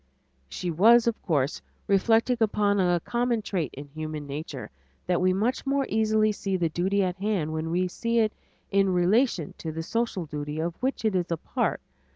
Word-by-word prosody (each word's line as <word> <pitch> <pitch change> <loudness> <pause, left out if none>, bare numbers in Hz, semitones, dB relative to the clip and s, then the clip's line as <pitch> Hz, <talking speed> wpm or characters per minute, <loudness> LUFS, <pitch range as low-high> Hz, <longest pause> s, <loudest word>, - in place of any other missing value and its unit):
She 175 - -3
was, 225 +8 +6
of 235 -2 -1
course, 145 -5 0 0.2
reflecting 225 +5 +3
upon 205 -2 +2
a 175 -2 +3
common 240 -2 0
trait 175 -9 -2
in 140 +2 -7
human 155 0 -5
nature, 145 - -6 0.3
that 180 -1 +1
we 185 0 +4
much 215 +7 0
more 275 0 +1
easily 215 0 +2
see 195 -2 -2
the 170 -2 0
duty 190 +5 +1
at 180 0 -2
hand 190 -6 -1
when 160 +1 -3
we 180 +2 +1
see 230 +6 -2
it 220 -2 +3 0.4
in 195 -1 +3
relation 185 - +2
to 160 - -4
the 165 +1 -4
social 230 -3 -2
duty 150 0 -5
of 170 +1 -1
which 260 -2 -1
it 215 -3 +2
is 180 -1 0
a 170 - -1
part. - - -2
190 Hz, 190 wpm, -26 LUFS, 165-220 Hz, 0.4 s, was